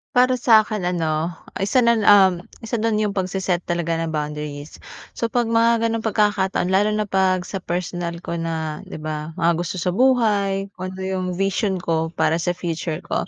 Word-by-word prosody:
Para 255 0 +4
sa 225 -2 +6
akin 210 -5 -3
ano, 165 -1 -1 0.2
isa 235 +6 +2
nun, 235 -3 +3
um, 190 -3 +6 0.2
isa 225 0 -2
dun 225 -1 +1
yung 210 -1 0
pagse-set 185 -2 -1
talaga 170 -1 -1
ng 160 -1 -2
boundaries. 150 0 -5 0.3
So 230 - -2
pag 240 +1 +1
mga 230 0 +2
ganung 230 0 0
pagkakataon, 195 -3 +1
lalo 200 +2 +3
na 215 - +1
pag 190 -2 +1
sa 195 - -5
personal 175 -1 -4
ko 170 0 -4
na 160 -2 -3
'di - - -8
ba, 155 +1 -5
mga 170 -2 +2
gusto 175 +1 -3
sa 180 0 -1
buhay, 205 -5 +2
although 185 0 -5
yung 190 -1 -2
vision 195 -1 -1
ko 160 0 -1
para 165 - +1
sa 175 +1 -1
future 165 -2 -4
ko, - - -2
185 Hz, 180 wpm, -22 LUFS, 170-210 Hz, 0.3 s, sa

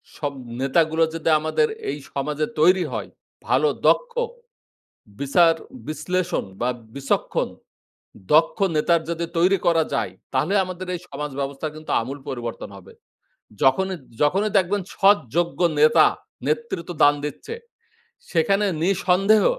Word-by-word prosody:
সব 145 -2 -3 0.3
নেতাগুলো 160 +4 +2
যদি 165 0 -1
আমাদের 155 0 +1 0.2
এই 140 - -3 0.2
সমাজে 150 +2 -1
তৈরী 180 +4 +5
হয়। - - -4 0.4
ভালো - - +3 0.2
দক্ষ, - - +3 1.1
বিচার-বিশ্লেষণ 170 - 0 0.2
বা 120 - +1 0.3
বিচক্ষণ, 140 0 -1 0.9
দক্ষ 160 +2 +4 0.2
নেতার 165 +2 +3
যদি 170 0 -2
তৈরি 185 +3 +4
করা 165 -2 +4
যায় - - -1 0.2
তাহলে 165 +6 +1
আমাদের 185 0 -6
এই - - -5
সমাজ 150 +1 -5
ব্যবস্থার 140 +2 -4
কিন্তু 155 0 -7
আমূল 135 +5 -6
পরিবর্তন 120 -3 -5
হবে। 95 - -15 0.7
যখনই 190 +8 +3 0.3
যখনই 195 +8 +2
দেখবেন 195 +2 0
সৎ, 200 +1 +5 0.2
যোগ্য 175 0 0 0.2
নেতা 155 +1 +6 0.4
নেতৃত্ব 435 - -2
দান 145 0 +7
দিচ্ছে। 150 - -6 0.8
সেখানে 195 +5 +2 0.2
নিঃসন্দেহ 195 +3 +3
165 Hz, 120 wpm, -23 LUFS, 150-185 Hz, 1.1 s, দান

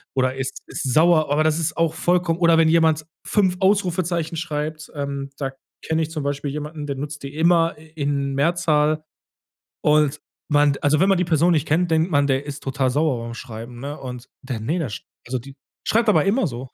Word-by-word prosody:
oder 130 0 +1
ist 135 -1 -4
ist 130 - -3
sauer. 160 -1 +4
Aber 150 +2 +3
das 155 0 +2
ist 165 -1 -1
auch 165 -1 +1
vollkommen 175 0 +1
oder 170 -2 +5
wenn 160 - +5
jemand 160 -2 +3 0.2
5 190 -4 +2
Ausrufezeichen 180 -4 +1
schreibt, 155 -1 -4
ähm, 140 -1 -4
da 135 -2 -2 0.3
kenne 160 0 0
ich 160 - -5
zum 155 -3 -3
Beispiel 145 0 -2
jemanden, 150 +1 -5
der 140 -1 -3
nutzt 150 +1 -6
die 140 +1 -7
immer 165 0 +3
i 160 - -16
in 140 -2 -1
Mehrzahl. 155 -1 +2 0.8
Und 150 -1 +3 0.3
man 145 -1 +4
also 145 +1 +3
wenn 190 - +4
man 195 - +4
die 180 - +2
Person 170 +1 +3
nicht 155 -2 +1
kennt, 170 +3 +1
denkt 160 +2 +2
man, 145 -1 +3
der 135 +1 +1
ist 145 +1 -7
total 135 -1 0
sauer 135 -4 0
beim 115 0 -6
Schreiben, 120 +1 -8
ne? 145 +3 -6
Und 125 -1 -8
der 130 -5 -4
ne, 150 +11 -1
der 160 -6 -2
sch 105 - -7 0.2
also, 125 +1 -2
die 135 +3 -12 0.3
schreibt 230 0 +2
aber 210 - +4
immer 215 +3 +2
so. 125 -1 -6
150 Hz, 210 wpm, -22 LUFS, 140-165 Hz, 0.8 s, oder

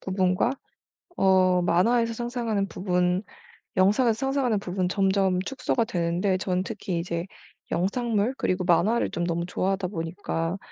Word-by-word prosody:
부분과 185 +4 +1 0.6
어 185 -1 +4
만화에서 230 +7 +2
상상하는 230 -4 -2
부분, 180 -1 0 0.6
영상에서 210 +6 +4
상상하는 270 -3 0
부분 185 -1 -2
점점 190 -2 +2
축소가 255 -3 0
되는데 180 -1 0
저는 185 -1 -1
특히 185 -1 -4
이제 170 +1 -3 0.4
영상물 220 +4 0
그리고 185 0 0
만화를 185 +7 +2
좀 175 - -2
너무 170 0 -1
좋아하다 185 +1 -1
보니까 165 0 -3
190 Hz, 320 characters per minute, -26 LUFS, 180-220 Hz, 0.6 s, 어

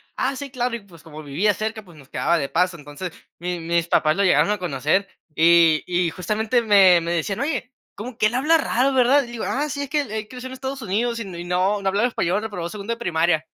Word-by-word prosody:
"Ah, 265 +1 -1
sí, 280 +1 -6
claro". 250 -2 -2
Y - - -5
pues 170 -5 -18
como 155 -2 -10
vivía 165 +9 +1
cerca, 220 +1 -4
pues 170 -4 -16
nos 140 -2 -16
quedaba 170 - +1
de 140 -2 -3
paso. 180 0 +1
Entonces 145 +4 -7 0.3
mi 175 0 -3
mis 170 0 0
papás 155 -2 +2
lo 200 - +1
llegaron 165 -3 +4
a 210 - +1
conocer 175 +3 0 0.3
y 165 -1 +5
y 175 -1 0
justamente 215 +8 0
me 195 -5 +6
me 170 +1 -3
decían: 175 +3 -1
"Oye, 275 -3 -2 0.2
cómo 230 +3 -8
que - - +2
él 215 - -4
habla 300 +6 +4
raro, 270 -3 +1
¿verdad?". 260 +2 +4
Le 240 - -10
digo: 230 - -5
"Ah, 290 +3 -1
sí, 285 0 -4
es 280 - -7
que 300 +1 +1
él 260 -7 -8
él 215 0 -4
creció 250 +2 -8
en 260 - -8
Estados 265 +1 -5
Unidos 230 +3 -1
y 230 - -5
no 180 +3 -1
no - - -1
hablaba 205 +5 +2
español, 195 -4 -1
reprobó 200 -6 -5
segundo 210 +4 -4
de - - -8
primaria". 165 -6 +1
200 Hz, 245 wpm, -22 LUFS, 170-240 Hz, 0.3 s, me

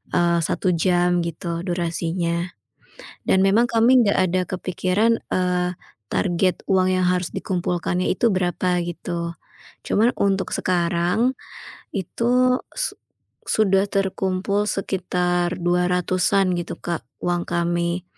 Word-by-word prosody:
eee, 170 0 +3
1 180 +3 0
jam 175 +1 +2
gitu 170 0 -4
durasinya. 170 0 -1 0.8
Dan 190 0 +4
memang, 220 +5 +4
kami 235 +2 +5
nggak 200 - +2
ada 185 - +2
kepikiran, 185 +5 0
eee, 180 -1 0 0.4
target 180 0 +1
uang 185 -1 +3
yang 185 - +1
harus 180 -2 0
dikumpulkannya 180 0 -1
itu 230 +5 +2
berapa 180 0 0
gitu. 170 0 -4 0.5
Cuman 230 +4 +3
untuk 195 -1 +1
sekarang 180 +7 +1 0.6
itu, 250 +6 +1 0.2
su - - -1 0.5
sudah 195 -2 +2
terkumpul 195 +1 0
sekitar 180 -2 -1
200-an 180 +1 +1
gitu, 175 - -5
Kak, 170 -2 -4 0.2
uang 175 0 0
kami. 170 +1 -1
180 Hz, 110 wpm, -22 LUFS, 175-195 Hz, 0.8 s, kami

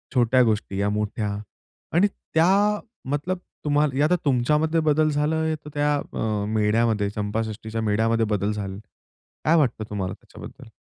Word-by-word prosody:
छोट्या 125 +1 +4
गोष्टी 105 -3 -1
या 100 +1 +1
मोठ्या 105 0 -2 0.7
आणि 195 +4 +5
त्या 200 +4 +2 0.3
मतलब 160 +6 -1 0.3
तुम्हाला 145 -1 +2
आता 180 - +3
तुमच्यामध्ये 150 +5 +2
बदल 155 0 +3
झालाय, 155 +2 0
तर 150 0 -11
त्या 145 0 +2
अ, 105 -6 -2
मेढ्यामध्ये 110 -1 +2
चंपाषष्ठीच्या 110 +2 -3
मेढ्यामध्ये 110 +2 +1
बदल 100 +2 -1
झाले. 100 -2 -5 0.7
काय 160 +2 +5
वाटतं 125 -7 +1
तुम्हाला 95 -3 -3
त्याच्याबद्दल? - - -12
120 Hz, 135 wpm, -24 LUFS, 105-150 Hz, 0.7 s, आणि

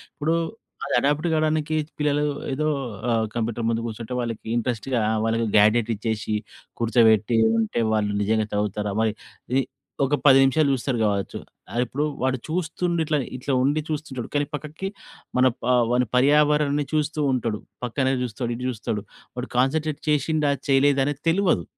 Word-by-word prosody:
ఇప్పుడు 155 +2 0 0.5
అది 140 - -3
అడాప్ట్ 145 +4 +1
కావడానికి 155 0 +1 0.2
పిల్లలు 150 0 +1 0.3
ఏదో 155 +3 0 0.4
ఆహ్, 115 -1 +2
కంప్యూటర్ 115 0 -2
ముందు 115 0 0
కూసుంటే 115 +2 -6
వాళ్ళకి 115 -2 -4
ఇంట్రెస్ట్‌గా 120 +1 -1 0.2
వాళ్ళకి 115 +1 +1
గ్యాడెట్ 110 +2 +4
ఇచ్చేసి, 110 0 -3 0.5
కూర్చోబెట్టి 115 -1 +4 0.2
ఉంటే 115 +1 0
వాళ్ళు 105 -1 +1
నిజంగా 110 +1 +1
చదువుతారా 105 0 -1
మరి? 110 -1 +2 0.4
ఇది 135 +1 +3 0.4
ఒక 145 +2 +2
10 135 -1 +8
నిమిషాలు 140 +2 +3
చూస్తరు 130 -1 -1
కావచ్చు. 100 -2 -1 0.5
ఇప్పుడు 140 +6 -2 0.2
వాడు 130 0 +1
చూస్తుండిట్ల, 165 -1 -1 0.2
ఇట్లా 135 +2 -2
ఉండి 145 +3 +2
చూస్తుంటడు. 145 -6 -4
కానీ, 145 0 +2
పక్కకి 155 +6 -6 0.5
మన 130 - +5 0.5
వాని 125 -1 +2
పర్యావరణాన్ని 145 +1 +3
చూస్తూ 155 0 0
ఉంటడు, 115 -4 -1 0.3
పక్కనే 130 +2 0
చూస్తడు, 120 +1 -3
ఇటు 125 +2 -5
చూస్తడు, 105 -3 -3 0.3
వాడు 125 - -4
కాన్సంట్రేట్ 150 +3 +1
చేసిండా, 150 0 +2 0.2
చేయలేదా 135 0 +4
అనేది 145 0 -3
తెలువదు. 170 - +2
130 Hz, 140 wpm, -24 LUFS, 115-150 Hz, 0.5 s, 10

